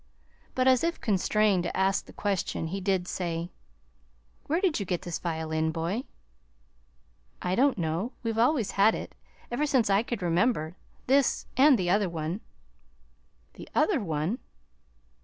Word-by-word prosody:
But, 255 0 +2
as 260 +1 +5
if 335 0 0
constrained 210 -1 +2
to 175 - -3
ask 195 +1 +1
the - - -11
question, 195 -5 -2
he 195 +3 -4
did 190 -2 0
say: 170 -1 -3 1.0
"Where 320 +4 +1
did 365 - +1
you - - -1
get 180 -2 -2
this 175 - -4
violin, 160 -1 -1
boy?" 170 +10 -2 1.3
"I 180 - -2
don't 265 +5 +3
know. 170 - -2
We've 225 -1 -1
always 235 -4 +2
had 205 +3 +4
it, - - -7 0.4
ever 295 +5 0
since 250 -8 +2
I 195 +1 +4
could 235 -4 -4
remember 170 -2 +1 0.3
this 275 0 +2
and 275 0 +6
the 180 -3 0
other 200 -1 +2
one." 165 +4 -4 1.1
"The - - -11
OTHER 390 -9 +3
one!" 165 - -2
195 Hz, 150 wpm, -28 LUFS, 175-240 Hz, 1.3 s, and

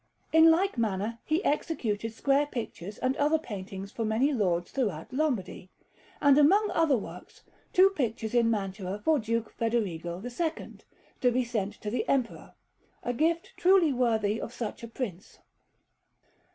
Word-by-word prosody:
In 320 0 +8
like 345 -3 +2
manner, 220 +1 -1
he 315 +5 0
executed 225 -8 -1
square 275 +5 +1
pictures 210 - -6
and 260 +1 0
other 300 +2 +3
paintings 200 -7 -7
for 230 - -3
many 225 +7 +1
lords 175 -7 0
throughout 205 - -2
Lombardy; 250 -11 -2 0.5
and, 285 0 +5
among 400 +8 +4
other 320 -5 +3
works, 210 - -10 0.3
two 380 +2 +6
pictures 225 - -2
in 235 -1 +4
Mantua 195 -2 -2
for 300 +8 +2
Duke 230 0 -2
Federigo 185 -7 -2
II, 310 +7 -3 0.5
to 250 -2 +4
be 255 +1 +1
sent 215 -4 -2
to 210 - -4
the 245 - -2
Emperor, 260 -4 -1 0.5
a 245 - -1
gift 330 +6 0
truly 360 -5 +4
worthy 225 -4 +1
of - - -5
such 235 -3 -5
a 230 - -6
Prince. 220 -6 -6
235 Hz, 150 wpm, -28 LUFS, 210-290 Hz, 0.5 s, In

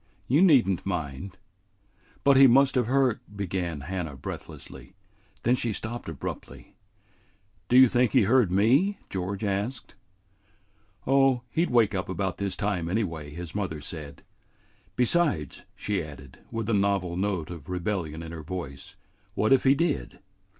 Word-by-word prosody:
You 145 +7 +3
need 145 - +6
n't 95 -3 -1
mind." 90 0 -4 0.9
"But 140 -1 +5
he 135 0 +8
must 135 +2 +5
have 125 -4 +1
heard 130 -2 +2
" 105 - -16
began 85 -4 -3
Hannah 85 -1 -4
breathlessly. 95 - -9 0.5
Then 120 - +3
she 120 -2 0
stopped 110 -1 -5
abruptly. 80 -5 -7 1.0
"Do 125 - +5
you 130 0 +9
think 120 0 +2
he 130 -5 +5
heard 115 -2 +3
me?" 130 - +3
George 95 +2 -3
asked. 105 +5 -3 1.1
"Oh, 135 -2 +3
he 165 - +2
'd - - -9
wake 115 -4 +3
up 95 -2 -3
about 95 +1 -2
this 100 -1 -2
time 95 -5 -2
anyway," 85 -7 -2
his 80 +2 -8
mother 95 -7 -3
said. 75 -2 -8 0.7
"Besides," 125 - +1
she 105 -2 -2
added, 70 -3 -12
with 115 -2 -4
a 115 - +1
novel 100 -3 +1
note 95 -4 -2
of 80 -3 -9
rebellion 90 -3 -3
in 80 - -8
her 85 -1 -7
voice, 75 -5 -7 0.4
"what 110 +4 +3
if 135 - +3
he 135 +1 +6
did? 155 - -1
100 Hz, 155 wpm, -27 LUFS, 85-125 Hz, 1.1 s, you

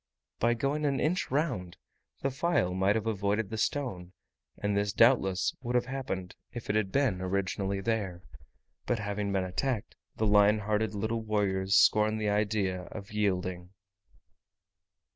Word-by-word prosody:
By 120 +1 +3
going 140 +5 -1
an 140 -2 +1
inch 180 +5 0
round, 130 - -1 0.5
the 135 - +1
file 135 - +1
might 95 +3 +2
have 110 -1 -1
avoided 105 0 0
the 110 - -3
stone, 100 -9 -2 0.4
and 105 0 -1
this 100 -1 0
doubtless 110 -6 +3
would 120 -1 -3
have 125 0 +3
happened, 125 -9 -4 0.2
if 120 -3 -4
it - - -2
had 105 -3 +1
been 130 -10 +1
originally 95 +1 -1
there: 95 -5 -2 0.6
but 120 - +1
having 105 -1 -2
been 95 -1 +1
attacked, 105 +5 -2 0.2
the 110 - +1
lion 105 0 +5
hearted 105 0 -1
little 110 +3 -1
warriors 100 -3 0
scorned 110 0 +4
the 105 -1 0
idea 100 -3 0
of 100 -2 -9
yielding. 95 -3 -1
105 Hz, 150 wpm, -30 LUFS, 95-115 Hz, 0.6 s, lion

